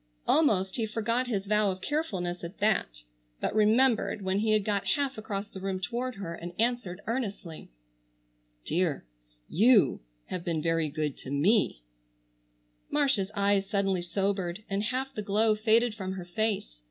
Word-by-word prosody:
Almost 195 -12 +3
he 225 -2 0
forgot 230 +3 -1
his 200 -5 -1
vow 210 0 +2
of 185 -1 -3
carefulness 185 - -2
at 170 +4 -7
that, 125 - 0 0.4
but - - -1
remembered 220 0 +3
when 190 +1 0
he 220 +1 0
had 215 -2 +3
got 205 -2 0
half 275 -2 -1
across 205 -2 -4
the 190 - -9
room 190 0 -2
toward 240 +6 -3
her, 190 -4 -5
and 175 +1 -7
answered 225 -6 -1
earnestly: 205 -9 -4 1.0
"Dear, 165 - 0 0.4
you 220 +3 +4 0.2
have 180 - -5
been 165 -2 -1
very 165 0 +1
good 150 -1 -2
to - - -9
me." 145 - +2 1.1
Marcia's 275 -10 +2
eyes 200 -1 +2
suddenly 195 -3 +1
sobered 190 +1 -2
and 200 +2 -1
half 260 +3 -2
the 215 - -3
glow 215 +2 +3
faded 220 +2 +3
from 190 -3 -4
her 185 -2 -6
face. 175 - -2
200 Hz, 155 wpm, -29 LUFS, 180-225 Hz, 1.1 s, you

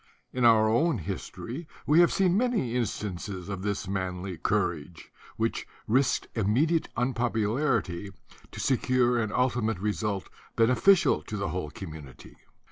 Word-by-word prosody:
In 125 -1 +1
our 110 -2 +6
own 145 +7 +2
his 80 - -5
tory 145 +8 -7 0.2
we 150 +3 +5
have 175 - +6
seen 185 -2 +2
many 225 - +1
instances 100 -5 -3
of 100 -2 -4
this 100 -1 -2
manly 95 -1 -3
courage, 85 -3 -2 0.3
which - - -1 0.2
risked 130 +4 +2
immediate 130 - +1
unpopularity 120 - 0 0.4
to - - -9
secure 125 -2 +2
an 110 -2 -2
ultimate 120 -4 +1
result 105 0 -2 0.3
beneficial 135 +9 +4
to 105 - -6
the 100 -1 -2
whole 90 -4 -3
community. 75 -7 -10
110 Hz, 130 wpm, -28 LUFS, 95-130 Hz, 0.4 s, our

